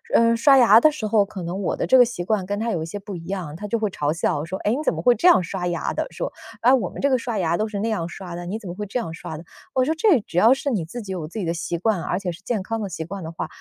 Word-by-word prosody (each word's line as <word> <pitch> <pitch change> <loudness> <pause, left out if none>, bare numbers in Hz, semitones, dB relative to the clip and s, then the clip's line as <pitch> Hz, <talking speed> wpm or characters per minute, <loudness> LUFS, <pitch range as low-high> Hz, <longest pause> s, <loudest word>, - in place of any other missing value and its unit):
呃， 230 0 +5
刷 275 +3 +6
牙 230 -3 +7
的 310 +5 +5
时 265 -8 -5
候， 210 -1 +3
可 195 -3 -8
能 180 +4 -4
我 - - -1
的 - - -2
这 260 - +4
个 - - +10
习 230 -7 -5
惯 200 0 0
跟 205 +1 -2
他 230 0 -1
有 165 - -1
一 160 - -4
些 205 - -5
不 200 -1 -8
一 165 - -8
样， 180 -6 -4
他 210 +4 -6
就 230 - 0
会 215 -1 0
嘲 145 -3 -1
笑 155 -2 -1
说： 185 +4 -4
“哎， 210 - +3
你 245 - +1
怎 - - +2
么 - - -5
会 245 - +6
这 345 - +2
样 350 - +6
刷 180 +1 -3
牙 175 - -2
的？” - - -2
说， - - -5 0.3
“啊， 250 +3 +5
我 215 -10 +2
们 - - -10
这 280 - +2
个 255 - +3
刷 230 -2 -3
牙 170 -2 +1
都 215 +4 -1
是 205 -2 -4
那 225 - 0
样 175 -7 -2
刷 180 -1 -8
的， 175 0 -6
你 210 +4 -3
怎 210 -5 -10
么 175 - -5
会 210 - -5
这 250 - -3
样 165 -9 -5
刷 160 -1 -7
的？” 165 - -10 0.3
我 255 -1 +3
说： 315 - +1
“这 325 - +4
只 175 -3 -2
要 230 +7 +6
是 280 +1 -2
你 205 -9 0
自 235 +7 -7
己 195 - -7
有 175 -5 -4
自 175 - -9
己 195 - -2
的 165 - 0
习 170 0 -3
惯， 195 0 0
而 180 - -1
且 180 -3 -3
是 180 +4 -11
健 210 -2 -2
康 225 +2 -3
的 200 - -3
习 160 -2 -5
惯 190 +1 -7
的 160 - -6
话， 165 - -5
200 Hz, 375 characters per minute, -23 LUFS, 175-230 Hz, 0.3 s, 个